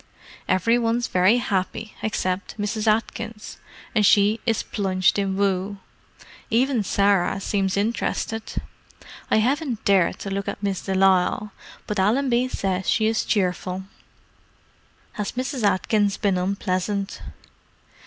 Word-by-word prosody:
"Every 230 +6 +3
one's 235 +1 0
very 185 +4 +3
happy 215 -1 -2
except 190 -2 -2
Mrs. 210 +1 -2
Atkins, 220 0 -2 0.3
and 215 - +3
she 205 +2 +4
is 225 -2 +1
plunged 190 -1 +1
in 195 -1 -1
woe. 200 0 0 0.7
Even 250 +1 +2
Sarah 195 -1 +2
seems 195 -1 -1
interested. 225 +1 -2 0.7
I - - +4
haven't 255 +1 0
dared 195 -3 +3
to 195 - -5
look 195 0 -3
at - - -5
Miss 195 -2 -1
de 195 - -2
Lisle, 190 +2 +3 0.3
but 210 -1 -3
Allenby 245 +5 +2
says 190 -6 -2
she 220 - +2
is 220 0 +1
cheerful." 185 -1 -1 1.3
"Has 210 -1 -4
Mrs. 255 +1 -3
Atkins 205 0 +2
been 195 -3 +1
unpleasant?" 195 +1 -2
205 Hz, 125 wpm, -23 LUFS, 190-225 Hz, 1.3 s, she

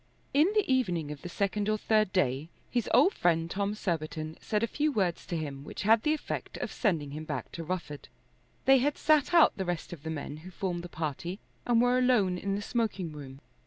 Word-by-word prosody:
In 305 +7 +5
the 425 - +3
evening 180 - +1
of 150 - -8
the 175 - -6
second 200 +3 -1
or 215 - +2
third 215 -2 +2
day 145 -3 0 0.2
his 240 -3 0
old 285 - +5
friend 165 -1 +1
Tom 200 +1 -1
Surbiton 155 -4 -3
said 210 0 -1
a - - +5
few 300 +5 0
words 185 -8 -1
to 170 - -2
him 140 -3 -5
which - - -6
had 220 +2 +5
the 305 +4 +2
effect 305 - -5
of - - -4
sending 160 - 0
him 155 +2 -5
back 155 -1 -5
to 165 - -6
Rufford. 165 -4 -5 0.6
They 270 0 +7
had 290 +3 +1
sat 305 0 +3
out 335 -3 +6
the 190 - -1
rest 175 -1 -3
of 160 - -9
the 160 - -5
men 150 -1 -5
who 165 +4 -10
formed 180 -1 -3
the 175 - -8
party 165 +3 -4 0.3
and 240 -1 +4
were 245 +1 +4
alone 210 -8 +3
in 195 +1 -1
the 205 - -3
smoking 210 -7 -1
room. 140 -2 -10
185 Hz, 220 wpm, -30 LUFS, 160-230 Hz, 0.6 s, They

